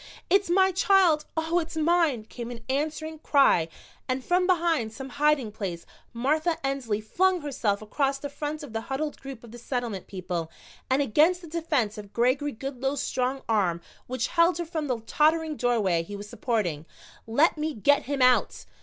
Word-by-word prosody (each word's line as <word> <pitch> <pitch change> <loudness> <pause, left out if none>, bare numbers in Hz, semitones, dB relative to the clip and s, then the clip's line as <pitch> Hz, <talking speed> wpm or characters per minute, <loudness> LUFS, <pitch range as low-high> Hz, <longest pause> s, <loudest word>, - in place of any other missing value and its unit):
"It's 390 -1 +4
my 380 +2 +4
child, 370 -5 +4
Oh, 325 +2 +1
it's 330 -1 -5
mine!" 320 -7 +2
came 235 +1 -7
an 240 -2 -8
answering, 310 +3 -2
cry, 275 - +4 0.4
and 255 0 -1
from 360 +1 +2
behind 335 - +1
some 265 +4 -8
hiding 285 -4 +1
place 185 -5 -5 0.3
Martha 310 +8 0
Ensley 260 -6 -1
flung 360 - +1
herself 230 -8 -1
across 275 +5 0
the 285 - -5
front 295 +2 -5
of 270 -7 -9
the 225 - -2
huddled 285 +5 -4
group 270 -4 -9
of 235 - -12
the 240 - -10
Settlement 240 -6 -4
people 180 -4 -4 0.4
and 265 +2 +3
against 315 +8 +3
the 340 - -10
defense 290 -10 -1
of 205 -1 -11
Gregory 255 +5 +1
Goodloe's 270 +2 -3
strong 260 +1 -1
arm 190 -7 +1 0.3
which 255 +1 -2
held 335 0 +3
her 345 - -3
from 315 -2 -3
the 245 -4 -2
tottering 310 +5 +2
doorway 220 -10 +1
he 205 +5 -8
was 205 +1 -8
supporting. 205 - -2 0.4
"Let 285 +9 +3
me 305 -1 -2
get 285 +7 +3
him 275 0 0
out!" 250 0 +3
275 Hz, 175 wpm, -26 LUFS, 225-315 Hz, 0.4 s, It's